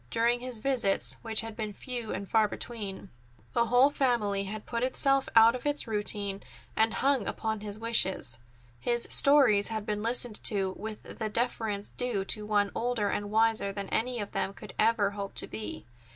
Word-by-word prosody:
During 235 - +1
his 250 -1 -4
visits, 240 -7 +2
which 225 -1 0
had 225 -1 -8
been 215 -2 -4
few 240 0 -6
and 200 +1 -5
far 220 0 +3
between, 205 -3 -6 0.4
the 235 - +2
whole 250 +5 +5
family 215 -8 0
had 210 +2 -7
put 235 -1 -3
itself 270 +1 +2
out 225 +1 +8
of 250 - -6
its 290 0 0
routine, 205 -2 -3 0.3
and 220 0 +3
hung 270 -6 +1
upon 220 -1 -3
his 205 0 -7
wishes. 190 - +1 0.4
His 235 - +2
stories 260 -8 +6
had 220 -2 -4
been 210 -1 -2
listened 235 0 +1
to 195 -3 +1
with 215 0 -8
the 220 -1 -2
deference 220 -3 -2
due 240 -6 -1
to 210 +1 -2
one 205 -1 +1
older 235 -4 -1
and 205 0 -3
wiser 220 -2 +2
than 200 -1 -6
any 245 +1 -1
of 205 - -5
them 195 - -2
could 210 - -11
ever 215 -2 +3
hope 200 -1 -6
to - - -1
be. 110 0 -7
220 Hz, 180 wpm, -29 LUFS, 205-240 Hz, 0.4 s, out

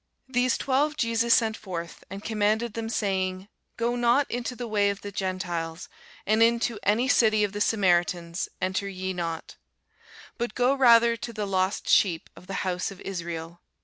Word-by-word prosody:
These 250 -1 +1
twelve 290 +3 +1
Jesus 230 -2 +3
sent 220 -2 +1
forth, 170 -5 -7
and 195 +2 -8
commanded 220 +1 0
them, 225 -1 -4
saying, 190 -3 -1 0.3
Go 235 +1 0
not 245 +4 +3
into 245 +1 -3
the 245 -1 -5
way 205 -2 +2
of 200 0 -4
the 205 - -7
Gentiles, 180 -3 -3 0.4
and 215 +2 +2
into 230 -1 +2
any 225 +5 +2
city 215 -5 +4
of 205 - 0
the 205 - -4
Samaritans 175 -4 +1
enter 185 +2 -1
ye 190 0 -4
not: 165 -2 -5 0.8
but 240 +1 -3
go 250 +2 +3
rather 235 -3 +6
to 235 - -6
the 215 -2 -3
lost 190 0 -1
sheep 170 -5 +2
of 180 - -15
the 195 0 -3
house 180 -1 -1
of 195 - -11
Israel. 170 -2 -6
205 Hz, 170 wpm, -26 LUFS, 185-235 Hz, 0.8 s, rather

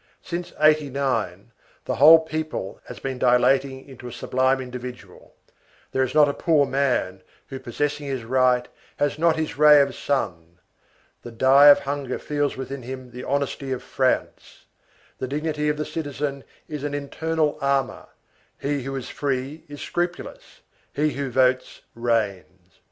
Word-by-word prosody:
Since 175 0 -5
'89, 135 -9 +1 0.3
the - - -2
whole 160 +4 +9
people 155 -10 -5
has - - -9
been 130 -2 -5
dilating 130 +2 +2
into 130 -2 -11
a - - -7
sublime 130 +2 0
individual; 125 -1 -9 0.6
there 130 - 0
is 130 +2 -1
not 150 -1 +6
a 140 - -1
poor 155 -3 +2
man, 130 -9 0 0.3
who, 135 - -6
possessing 145 +4 -3
his 135 -4 -3
right, 125 0 +2 0.3
has 145 +1 0
not 165 0 +3
his 160 -2 -4
ray 150 -1 +8
of 140 - +2
sun; 85 -11 -3 0.6
the - - -9
die 135 +5 +6
of 145 - +8
hunger 140 -2 -3
feels 145 -2 -2
within 135 +1 -6
him 130 0 -8
the 125 +1 -8
honesty 140 -1 -2
of 130 - -3
France; - - -2 0.5
the 130 - -3
dignity 150 +2 -2
of 150 - -1
the 150 - -2
citizen 145 -3 -4 0.2
is 150 -2 -6
an 145 -1 -2
internal 155 +1 -1
armor; 140 -1 -1 0.5
he 145 0 -1
who 135 +2 -5
is 130 - -5
free 140 +2 -3
is 145 -1 -10
scrupulous; 175 0 -4 0.3
he 150 +1 +1
who 140 0 -3
votes 130 0 +1
reigns. 100 -6 -3
135 Hz, 150 wpm, -23 LUFS, 125-145 Hz, 0.6 s, whole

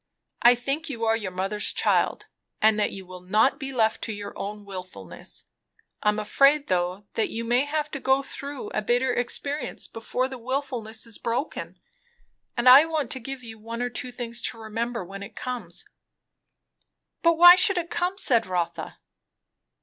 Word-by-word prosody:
I 240 +1 +7
think 275 +6 -3
you 230 -4 -3
are 225 0 +3
your 215 -4 -3
mother's 195 +3 -1
child, - - +1 0.3
and 215 0 +4
that 210 - +1
you 195 -1 -9
will 180 0 -10
not 215 +10 +2
be 270 -2 -5
left 225 -4 +1
to - - -4
your 205 -1 -7
own 205 +1 -6
wilfulness. 185 - -8 0.6
I 210 - +3
am 210 - 0
afraid, 275 +7 +3
though, 180 +2 0
that 225 - 0
you 230 - -4
may 245 +4 +2
have 300 0 -2
to 280 - -4
go 265 +1 +2
through 280 0 -7
a 215 - -2
bitter 245 +4 +1
experience 280 +5 -2
before 250 +3 -2
the 260 -1 -8
wilfulness 245 -3 -3
is 230 -2 -6
broken; 240 +6 -3 0.8
and 240 +1 +1
I 260 +4 +10
want 315 -5 -2
to 260 - -2
give 265 +1 -7
you 225 -1 -10
one 230 +2 -5
or 245 - -2
two 250 +1 -4
things 240 -1 -4
to 250 - -10
remember 225 -1 -3
when 195 +2 -9
it 200 - -9
comes." 250 -1 -3 1.4
"But 335 0 +4
why 350 +1 +11
should 375 +1 +3
it 340 -1 -2
come?" 355 +3 -1
said 235 - +3
Rotha. 180 -2 -3
235 Hz, 180 wpm, -25 LUFS, 210-270 Hz, 1.4 s, why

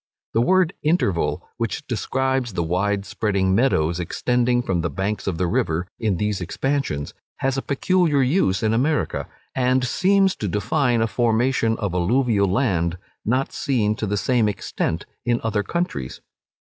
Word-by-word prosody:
The 115 - +3
word 185 +5 +3
interval, 95 - 0
which 115 +5 -3
describes 130 0 -1
the 85 - -1
wide 100 +4 0
spreading 100 -4 0
meadows 90 -8 +2
extending 120 +7 +1
from 90 -7 0
the 85 - -1
banks 95 +8 -3
of 90 -4 -1
the 90 - 0
river 85 0 0
in 105 -5 0
these 105 -1 -1
expansions, 110 - -2 0.2
has 135 0 0
a 135 - -1
peculiar 150 0 +2
use 125 - +1
in 110 0 +2
America, 145 +7 0 0.3
and 130 0 +2
seems 195 +7 +3
to 105 - -3
define 115 +4 +1
a - - +1
formation 115 0 +1
of 100 -5 -2
alluvial 100 +3 +2
land 90 -6 +1 0.3
not 130 +5 0
seen 110 -6 +1
to 110 - -2
the 105 +1 -1
same 115 0 +2
extent 85 -4 -3 0.2
in 120 -1 +1
other 110 -2 0
countries. 95 - -3
115 Hz, 155 wpm, -22 LUFS, 95-130 Hz, 0.3 s, The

